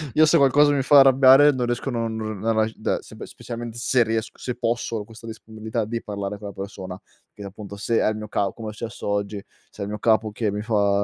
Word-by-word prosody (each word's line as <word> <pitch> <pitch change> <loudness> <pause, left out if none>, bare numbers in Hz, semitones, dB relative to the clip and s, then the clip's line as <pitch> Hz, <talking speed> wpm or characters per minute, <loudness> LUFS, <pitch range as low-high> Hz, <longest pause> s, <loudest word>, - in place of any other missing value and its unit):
Io 155 - +6
se 160 +2 +3
qualcosa 145 +1 +5
mi 140 - +1
fa 140 +1 +6
arrabbiare 135 +2 +7
non 125 -3 -2
riesco, 120 +3 -2
non 110 -3 -3
r 115 0 +1
rag 110 0 0
da - - -2
sepe - - -10
specialmente 120 -1 -8
se 120 0 +2
riesc 110 0 -3
se 125 -1 -5
posso, 115 -1 -2
ho 105 - -4
questa 115 +1 -13
disponibilità 110 0 -5
di 115 +1 -4
parlare 100 0 -5
con 105 - -8
la 100 - -8
persona, 95 -1 -7 0.3
che 105 - -10
appunto 100 +1 -9
se 115 +3 0
è - - +2
il 110 - -2
mio 105 0 -7
ca 100 -2 -1
come 115 -2 -7
è - - -12
successo 110 -1 -7
oggi, 100 0 -2 0.3
se - - -20
è - - -1
il 100 - -5
mio 105 0 -5
capo 110 -1 +2
che 105 -1 -2
mi 105 - -3
fa 100 -2 +1
110 Hz, 245 wpm, -23 LUFS, 105-120 Hz, 0.3 s, arrabbiare